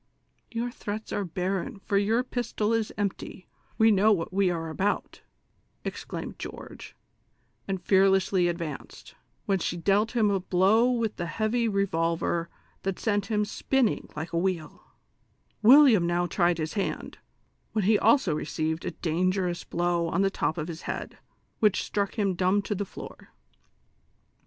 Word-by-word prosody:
" - - -43
Your 235 +1 -2
threats 215 -2 -6
are 205 - -1
barren, 190 +7 -3
for 200 +1 -3
your 215 +5 +2
pistol 230 -3 -2
is 225 -2 0
empty; 200 -2 -4 0.3
we 220 0 +5
know 210 +2 +4
what 180 -3 0
we 195 -1 +3
are 165 -2 -3
about," 195 +6 -2 0.6
exclaimed - - -6
George, - - -9 0.7
and 195 -1 -2
fear 190 +1 +4
lessly 190 -2 +2
advanced, 170 -4 -6 0.3
when 195 -1 +1
she 175 - -2
dealt 205 +6 +2
him 215 -3 +3
a 195 - +1
blow 195 +6 +3
with 230 -4 -1
the 175 - -3
heavy 220 +7 0
revolver 170 -4 0 0.3
that 195 -1 -2
sent 205 -3 0
liim 210 -1 +1
spinning 255 +3 0
like 160 +3 -5
a 170 - +2
wheel; 180 -3 -2 0.8
AV'illiam 245 -6 +7
now 175 +1 +1
tried 175 -1 +1
his 155 -1 -3
hand, 200 -3 -3 0.5
when 215 -4 0
he 210 +1 +4
also 265 - +4
received 160 +1 -2
a - - 0 0.2
dangerous 180 +2 0
blow 175 0 0
on 180 +4 +1
the 195 - +2
top 160 - -1
of 155 -1 -3
his 170 -1 -7
head, - - -5 0.4
which 210 -4 +3
struck 200 -1 -2
him 200 -3 +1
dumb 185 +3 +2
to 210 - -2
the 205 0 -3
floor. - - -11
195 Hz, 155 wpm, -27 LUFS, 175-215 Hz, 0.8 s, AV'illiam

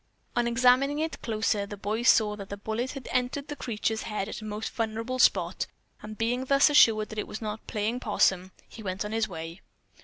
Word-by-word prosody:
On 240 0 +2
examining 250 +4 +4
it 320 +1 -3
closer, 215 -2 0
the 205 - -7
boy 210 +3 -2
saw 215 -3 +4
that 200 -2 -9
the 200 - -5
bullet 220 +5 -3
had 275 -3 -8
entered 255 +3 -1
the 295 - -4
creature's 220 -3 -2
head 210 -3 -3
at 220 - -6
a - - -8
most 215 +1 -4
vulnerable 230 +2 -3
spot, - - +3 0.3
and 215 0 -8
being 245 +3 0
thus 275 +2 +5
assured 220 -7 +5
that 215 - -5
it - - -3
was - - -6
not 215 -1 -6
playing 220 +3 -1
possum, 185 -6 +1 0.2
he 225 - -11
went 190 0 -3
on 210 - -5
his 220 0 0
way. 165 +1 -7
220 Hz, 210 wpm, -28 LUFS, 210-250 Hz, 0.3 s, thus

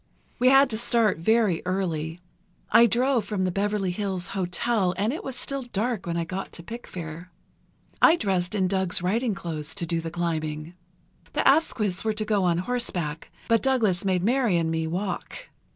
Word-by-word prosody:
We 255 - +5
had 270 +1 +6
to 220 - -1
start 230 -6 +2
very 215 -1 +2
early. 170 -3 -2 0.5
I 235 +1 +7
drove 245 +1 +2
from 200 -2 -2
the 185 - 0
Beverley 200 0 0
Hills 190 -2 -2
Hotel 190 +1 0
and 215 +6 0
it 320 - -5
was 265 - -5
still 275 +2 -3
dark 235 -4 -2
when 170 0 -1
I 170 - -1
got 185 +3 -5
to 170 - -6
Pickfair. 170 -5 -8 0.7
I 330 - +7
dressed 190 - -1
in 190 -2 +2
Doug's 190 -2 +1
riding 220 +4 0
clothes 160 -4 -5
to 185 -4 -1
do 165 0 -1
the 165 - -4
climbing. 160 -2 -3 0.6
The - - +1
Asquiths 225 - +2
were 220 -1 0
to 215 0 -2
go 205 -3 +1
on 170 -1 +2
horseback, 175 -7 -3 0.2
but 230 -1 +3
Douglas 225 -10 +2
made 185 -2 +1
Mary 235 -4 +2
and 165 -1 0
me 160 0 -1
walk. 185 - -4
190 Hz, 180 wpm, -25 LUFS, 175-230 Hz, 0.7 s, I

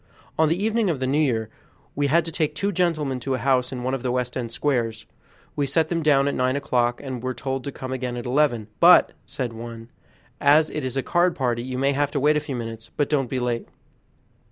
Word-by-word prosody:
On 160 -1 +3
the 165 - +1
evening 220 +1 +1
of 155 -6 -1
the 130 - -1
New 140 +3 +1
Year 115 -7 0 0.4
we 145 0 +1
had 160 +3 +3
to 165 - -4
take 155 -2 -1
two 200 +5 -1
gentlemen 155 -8 0
to 130 +1 -2
a - - -2
house 130 0 +1
in 125 -2 -5
one 130 +1 -1
of 135 - -2
the 125 -1 -1
West 125 0 -2
End 120 -3 -3
Squares. 115 -5 -1 0.5
We 145 -1 0
set 160 +4 +1
them 170 -1 0
down 140 -3 +3
at 140 - 0
nine 130 +1 +1
o'clock, 120 -4 0
and 130 -3 -5
were 130 +1 -3
told 135 -1 -3
to 140 - -3
come 130 -1 -6
again 125 -1 -3
at 120 - -6
eleven, 125 -4 +1
"but," - - +7 0.2
said 125 -3 -4
one, 115 0 -9 0.5
"as 150 +2 +4
it 150 - -3
is 130 0 -3
a 135 - 0
card 175 0 +2
party, 120 -3 0
you 130 +1 -5
may 135 +2 +2
have 145 +1 +1
to 145 - 0
wait 150 +2 +3
a - - +3
few 150 -3 -5
minutes, 115 -1 -6
but 145 0 0
don't 135 -5 +1
be 130 - -1
late." 120 -1 -2
135 Hz, 245 wpm, -24 LUFS, 125-150 Hz, 0.5 s, but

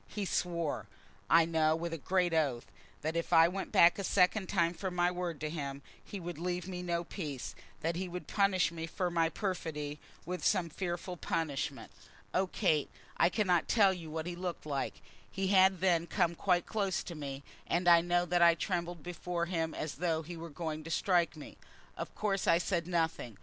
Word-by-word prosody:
He 205 -2 -4
swore, 170 - -1 0.4
I 165 0 +6
know, 160 -1 +2
with 165 +1 -4
a - - -2
great 180 +2 +1
oath, 140 -7 +1 0.4
that 160 +2 -1
if 170 0 -2
I 165 -1 +7
went 190 +2 -4
back 170 +3 +6
a - - -2
second 190 +1 +2
time 170 -3 +2
from 180 +1 -4
my 175 0 +3
word 175 -3 -3
to 155 - -2
him 140 -3 -5 0.2
he 200 - -7
would 175 -2 -6
leave 180 0 -2
me 180 -1 -5
no 170 -1 -1
peace, 150 -7 -5 0.3
that 165 +1 -1
he 185 +2 -2
would 180 +1 -6
punish 195 -4 +2
me 165 -1 -5
for 180 +1 -2
my 165 -1 +2
perfidy 160 -6 -3 0.3
with 180 +2 -4
some 180 -5 +2
fearful 175 +1 -4
punishment. 155 -5 -2 0.4
Oh, 190 +1 +2
Kate, 160 -6 +1 0.3
I - - +5
cannot 185 -4 +2
tell 200 -4 +5
you 170 -3 -8
what 160 0 -4
he 175 0 -4
looked 175 -2 -5
like. 140 -3 -3 0.3
He 195 -1 -2
had 190 -2 +5
then 170 -3 +2
come 175 -1 +1
quite 175 +1 +1
close 200 -3 -1
to 175 - -7
me, 140 -3 -6 0.2
and 175 +1 0
I 170 -1 +8
know 175 +1 +1
that 175 0 +1
I 170 -1 +7
trembled 175 -2 -3
before 175 0 -3
him 165 -2 -2
as 155 - -3
though 165 -1 0
he 170 +3 -7
were 165 0 -7
going 155 0 -4
to 165 - -8
strike 170 -2 +2
me. 150 - -10 0.4
Of - - -6
course 200 -2 -1
I 170 - +6
said 175 -1 -1
nothing. 160 - -1
170 Hz, 200 wpm, -32 LUFS, 160-180 Hz, 0.4 s, I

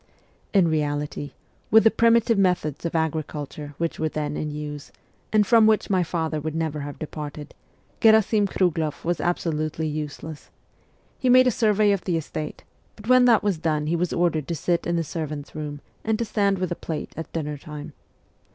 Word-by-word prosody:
In 190 -4 +4
reality, 145 -2 -2 0.4
with 220 0 +7
the 225 - +6
primitive 230 -1 +3
methods 175 -6 0
of 165 - -6
agri 160 -1 +1
culture 145 0 -8
which 165 -1 -2
were 155 - 0
then 150 -1 -3
in 155 - -3
use, 150 -1 -6 0.4
and 215 -1 +4
from 225 +1 +6
which 215 -1 +2
my 185 -2 +3
father 160 -3 -2
would 155 +1 -4
never 160 -2 -2
have 145 0 -6
departed, 150 -1 -7 0.5
Gherasim 220 -1 +5
Krugloff 165 -6 -1
was 175 0 0
absolutely 155 -2 -1
useless. 150 0 -6 0.7
He 255 - +1
made 255 +1 +7
a 250 - +4
survey 210 -2 +3
of 200 -3 -1
the 175 -3 +1
estate, 155 -1 -5 0.3
but 215 +2 -10
when 255 0 +7
that 235 -4 +5
was 200 -6 0
done 155 -2 0
he 160 +3 0
was 175 +1 -1
ordered 165 -4 0
to 170 - -2
sit 170 +2 -1
in 170 - 0
the 165 - +1
servants' 150 -2 -5
room 150 -2 -6 0.2
and 220 0 0
to 235 - -1
stand 200 -2 +1
with 185 -1 -2
a - - 0
plate 160 -2 -5
at 165 - -7
dinner 150 -3 -4
time. 150 0 -8
165 Hz, 190 wpm, -24 LUFS, 150-200 Hz, 0.7 s, with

